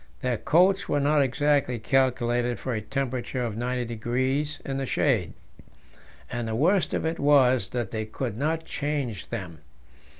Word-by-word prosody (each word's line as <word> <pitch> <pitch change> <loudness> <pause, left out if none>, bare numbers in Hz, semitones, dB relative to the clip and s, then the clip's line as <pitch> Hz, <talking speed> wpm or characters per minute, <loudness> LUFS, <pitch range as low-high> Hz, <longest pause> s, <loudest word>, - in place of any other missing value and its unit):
Their 125 -2 0
coats 180 - +3
were 145 - +2
not 145 +1 +3
exactly 140 -1 +1
calculated 120 0 +1
for 130 - -4
a 110 - -2
temperature 130 +1 -3
of 115 -3 -2
90° 125 +4 -1
in 135 -1 -3
the 135 - -2
shade, 115 - +1 1.0
and 120 -1 -3
the 110 - -2
worst 175 - +2
of - - -2
it 165 +1 -2
was 130 -7 +4
that 120 -5 -3
they 110 -1 -3
could 110 +1 -4
not 160 +6 -1
change 140 -7 -3
them. 90 -9 -6
125 Hz, 155 wpm, -26 LUFS, 120-145 Hz, 1.0 s, was